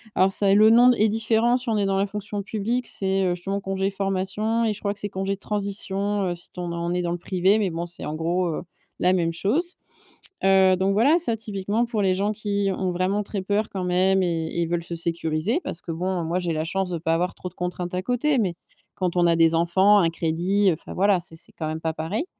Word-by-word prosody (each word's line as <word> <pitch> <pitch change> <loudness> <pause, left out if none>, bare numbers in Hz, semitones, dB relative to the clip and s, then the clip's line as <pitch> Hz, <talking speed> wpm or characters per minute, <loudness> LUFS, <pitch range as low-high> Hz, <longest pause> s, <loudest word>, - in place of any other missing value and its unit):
Alors 190 +1 +4
ça 195 0 +2
le 215 +2 +6
nom 240 +2 +7
d 250 - +3
est 215 +1 +4
différent 225 +2 +2
si 250 -1 -4
on 220 - +1
est 205 - +1
dans 195 0 +1
la 195 - +2
fonction 205 0 -5
publique, 225 +5 -2
c'est, 195 0 0
heu, 180 -1 +1
justement 195 +3 -3
congé 195 0 -1
de - - -10
formation 195 +4 -1
et 220 - +1
je 210 - -8
crois 200 -1 -1
que 205 - -7
c'est 205 - -3
congé 195 +1 -2
de - - -23
transition, 200 0 -2
heu, 175 - -2
si 175 - -5
t - - -10
on 175 -1 -3
est - - -4
on 170 0 -2
est 180 - 0
dans 175 -1 -2
le 175 - -2
privé 190 +4 +2
mais 200 -3 +1
bon 165 +1 -3
c'est 175 - -9
en 150 - -4
gros, 175 +3 0
heu, 160 - -3 0.4
la 180 +1 +4
même 170 -2 +1
chose, 280 - 0 0.7
heu, 190 -1 +5
donc 190 +2 +1
voilà 260 +11 +4
ça 320 -10 0
typiquement 210 +1 -1
pour 230 -3 -2
les 190 -2 +2
gens 200 +3 0
qui 205 -1 -1
ont 185 -1 -1
vraiment 185 +4 0
très 200 -1 -4
peur 205 +3 -1
quand 190 -2 -4
même 185 +1 +2
et 165 -2 -1
et 170 - -2
ils 170 - 0
veulent 170 0 -1
se 170 0 -6
sécuriser 165 - -1
parce 165 - -5
que 170 - -6
bon 180 +2 -2
moi 170 +3 -1
j'ai 175 -2 -2
la 155 0 -1
chance 190 +2 -2
de 175 - -2
ne - - -4
pas 165 0 0
avoir 175 +2 -1
trop 180 - -7
de - - -17
contraintes 180 0 -4
à 180 - -1
côté, 250 +7 +1
mais 190 -7 0 0.4
quand 180 -2 -2
on 175 - +4
a 170 - +4
des 165 0 +4
enfants, 185 +5 +4
un 170 -4 +3
crédit, 175 +5 +1
enfin 155 - -9
voilà, 195 0 +3
c'est 170 -1 -6
c'est 160 - -9
quand 155 - -3
même 160 +1 -4
pas 160 -1 -1
pareil. 165 - -3
190 Hz, 270 wpm, -24 LUFS, 175-205 Hz, 0.7 s, nom